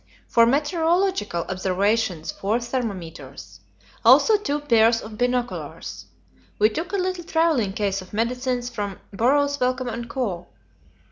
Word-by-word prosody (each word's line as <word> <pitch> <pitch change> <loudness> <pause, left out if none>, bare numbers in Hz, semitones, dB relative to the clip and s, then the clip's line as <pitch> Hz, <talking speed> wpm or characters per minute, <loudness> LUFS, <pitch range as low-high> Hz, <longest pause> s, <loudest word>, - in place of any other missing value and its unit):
For 230 0 +5
meteorological 320 - +1
observations, 190 -1 0
four 210 +4 -1
thermometers. 165 - -6 0.4
Also 275 - +7
two 295 -9 -1
pairs 230 -4 +4
of 215 -1 -9
binoculars. 245 +1 -3 0.5
We 215 +1 +4
took 330 +10 -4
a - - -1
little 370 -1 -2
travelling 320 - +1
case 200 -2 -1
of 185 - -13
medicines 245 +3 -1
from 205 -5 -5
Burroughs 285 +7 +2
Wellcome 255 0 0
and 235 0 -5
Co. 190 -10 -3
235 Hz, 125 wpm, -23 LUFS, 200-285 Hz, 0.5 s, Also